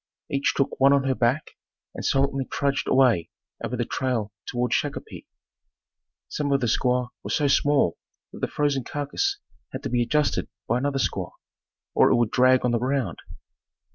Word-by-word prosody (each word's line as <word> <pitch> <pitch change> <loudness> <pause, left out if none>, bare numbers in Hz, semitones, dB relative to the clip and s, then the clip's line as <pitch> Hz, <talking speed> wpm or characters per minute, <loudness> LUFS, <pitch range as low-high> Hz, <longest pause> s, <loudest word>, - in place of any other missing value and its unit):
Each 140 0 +1
took 140 - 0
one 135 +1 +6
on 140 -1 +3
her 135 -1 +1
back 130 +4 0 0.4
and - - -7
silently 135 0 +1
trudged 140 +1 -1
away 120 -11 +3 0.3
over - - -3
the - - -1
trail 120 -6 -2 0.2
toward 125 0 -1
Shakopee. - - -3 1.0
Some 145 -2 -2
of 140 - +3
the 125 - 0
squaws 125 +2 +1
were - - -6
so 145 - +1
small 140 - +2 0.3
that - - -9
the - - -1
frozen 145 -3 0
carcass 145 - -2 0.3
had - - -6
to 135 - -3
be 120 0 +1
adjusted 150 +4 0 0.2
by 125 - +1
another 140 +1 -1
squaw 135 - -2 0.6
or - - +5
it - - +4
would 120 -2 +1
drag 130 0 +4
on 125 - +2
the 120 - +1
ground. 130 -7 -1
135 Hz, 170 wpm, -25 LUFS, 125-140 Hz, 1.0 s, one